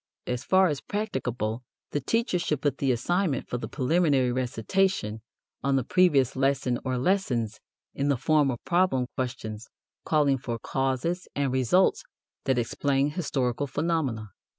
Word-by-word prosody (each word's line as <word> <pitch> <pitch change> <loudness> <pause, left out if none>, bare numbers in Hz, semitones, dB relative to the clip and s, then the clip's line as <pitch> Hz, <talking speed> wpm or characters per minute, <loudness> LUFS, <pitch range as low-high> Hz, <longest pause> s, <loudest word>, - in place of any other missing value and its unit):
As 125 0 -3
far 190 +5 +4
as 150 -6 0
practicable 125 - -3 0.3
the 145 - -1
teacher 230 - 0
should 150 -5 -1
put 145 -3 0
the 135 -2 +2
assignment 155 +4 0
for 125 - -3
the - - -5
preliminary 140 -3 +2
recitation 125 - 0 0.4
on 140 0 +1
the 135 - +2
previous 145 -5 +3
lesson 135 -2 +1
or 130 -1 -1
lessons 125 - 0 0.3
in 140 - -1
the 140 -2 +2
form 150 +2 +3
of 120 -3 -5
problem 175 -8 +2
questions 110 -4 -4 0.4
calling 145 -4 +2
for 120 -2 -4
causes 135 +9 -1
and 140 -2 0
results 130 +9 +3 0.4
that 130 -2 +2
explain 135 +4 +1
historical 145 -5 -1
phenomena. 140 -7 -1
135 Hz, 145 wpm, -27 LUFS, 125-165 Hz, 0.4 s, far